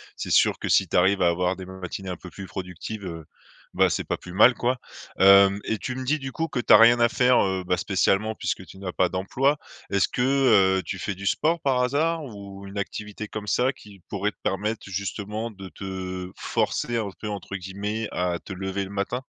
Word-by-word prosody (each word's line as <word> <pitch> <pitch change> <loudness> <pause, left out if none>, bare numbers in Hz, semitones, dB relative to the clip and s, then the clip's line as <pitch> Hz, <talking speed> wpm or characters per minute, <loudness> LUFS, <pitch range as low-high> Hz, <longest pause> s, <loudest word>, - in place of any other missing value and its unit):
C'est - - -5
sûr - - +4
que - - -4
si - - +4
tu - - 0
arrives 95 +2 +3
à 90 - +5
avoir 90 +2 0
des 95 0 -8
matinées 95 0 -7
un 90 - -4
peu 90 - -11
plus 95 +3 -8
productives, 95 +3 -6
heu, 80 -3 -7 0.5
bah, - - +4
c'est - - -1
pas - - -2
plus 90 - -11
mal, 115 +6 +6
quoi. 125 +1 0 0.4
Hem, 100 +1 +7
et 110 - -1
tu 130 - -4
me 130 0 -5
dis, 150 +4 +1
du 135 -2 -6
coup, 165 +4 -2
que 135 - -3
tu - - +4
as - - +11
rien 120 +2 +7
à 120 - +5
faire, 125 +1 +3
heu, 95 -1 -1
bah, 90 0 0
spécialement 100 +3 +1
puisque 95 -2 -3
tu 95 - -13
n'as 95 -2 -4
pas 90 -1 +1
d'emploi. 130 - 0 0.3
Est-ce 100 -1 +3
que, 125 - -3 0.6
heu, 95 - 0
tu - - -5
fais 100 - -3
du 100 +1 -6
sport, 165 - +1
par 130 -2 +1
hasard, 155 +5 0
ou 100 -4 -10
une 100 +1 -5
activité 105 +1 -5
comme 105 0 -6
ça 125 +5 +2
qui 105 -6 -15
pourrait 105 +1 -1
te - - -38
permettre, 105 +3 -1
justement, 105 +4 -4
de 95 -2 -10
te 95 -1 -6
forcer 120 -1 -1
un 105 -3 -2
peu, 105 - -4
entre 100 -1 -5
guillemets, 100 +4 -4
à 90 -1 -1
te 95 - -8
lever 95 +1 -3
le - - -10
matin? 100 +6 -2
100 Hz, 225 wpm, -25 LUFS, 95-115 Hz, 0.6 s, as